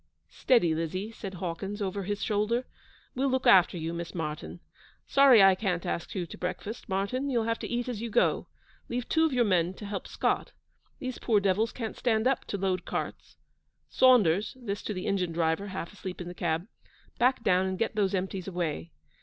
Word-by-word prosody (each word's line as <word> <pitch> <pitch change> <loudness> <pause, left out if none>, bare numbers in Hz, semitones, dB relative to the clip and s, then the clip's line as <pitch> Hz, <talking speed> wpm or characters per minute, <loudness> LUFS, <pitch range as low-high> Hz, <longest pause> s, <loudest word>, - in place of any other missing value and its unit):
'Steady, 205 -11 +3
Lizzie,' 185 +6 -3
said 195 -4 -7
Hawkins, 190 +4 -4
over 200 0 -2
his 205 +1 -2
shoulder. 220 +4 0 0.5
'We'll 270 +2 0
look 260 0 0
after 180 -1 +6
you, 165 0 -3
Miss 170 +1 -6
Martyn. 150 - -4 0.5
Sorry 270 -7 +7
I 195 0 +8
can't 185 -3 -2
ask 170 - -3
you 180 -2 -1
to - - -10
breakfast, 190 +6 -5
Martyn. 200 +9 -1
You'll 240 -4 +1
have 230 0 -1
to - - -5
eat 240 +1 -2
as 235 -4 -4
you 235 - -3
go. 240 - +2 0.4
Leave 245 0 -3
two 320 0 +3
of 320 - +1
your 250 -2 +3
men 180 -2 +1
to 210 - -9
help 200 -1 -5
Scott. - - -1 0.4
These 255 -2 -5
poor 220 -4 +3
devils 200 +3 +1
can't 225 -3 -5
stand 225 -2 +1
up 265 -1 +1
to 200 - -3
load 190 -1 -1
carts. - - -5 0.5
Saunders' 215 -5 +4
(this 205 -4 -4
to 210 - -4
the 185 - -4
engine 180 -4 0
driver, 165 +4 0
half 190 -1 -6
asleep 185 -2 -7
in 175 - -6
the 175 - -6
cab), 170 -1 -1 0.5
'back 250 0 +3
down 185 0 +3
and 190 0 -2
get 225 - -1
those 200 -2 +1
empties 185 0 -3
away.' 165 - -3
195 Hz, 195 wpm, -29 LUFS, 180-230 Hz, 0.5 s, I